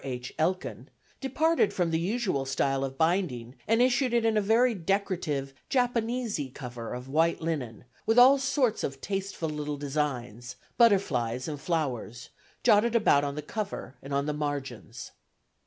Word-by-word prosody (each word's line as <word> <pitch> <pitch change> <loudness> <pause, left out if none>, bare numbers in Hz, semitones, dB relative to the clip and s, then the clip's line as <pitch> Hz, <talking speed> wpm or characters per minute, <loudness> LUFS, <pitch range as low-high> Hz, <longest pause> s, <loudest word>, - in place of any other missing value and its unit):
H. 125 -2 -5
Elkin), 180 +4 -1 0.3
departed 305 0 +1
from 175 -3 0
the 160 - +1
usual 190 - -1
style 135 0 0
of 135 0 -4
binding 160 -8 0
and 225 +2 +4
issued 255 -1 +2
it 235 -1 +2
in 225 -1 +2
a 210 - +3
very 230 +4 +3
decorative 175 -7 -1 0.2
"Japanesy" 235 - 0
cover 120 -4 -7
of 125 +1 -8
white 160 +5 +2
linen, 135 -9 -4 0.2
with 225 +2 +3
all 265 +3 +8
sorts 270 -4 +1
of 135 0 -3
tasteful 195 -2 -3
little 150 -1 -4
designs 125 -5 -3 0.2
butterflies 130 - +2
and 145 -3 -5
flowers 125 - -3 0.3
jotted 220 +3 +4
about 175 -10 +4
on 140 0 -2
the 150 - -5
cover 205 -3 -5
and 140 - -9
on 140 0 0
the 150 - -1
margins. 135 -6 -5
160 Hz, 155 wpm, -28 LUFS, 135-220 Hz, 0.3 s, all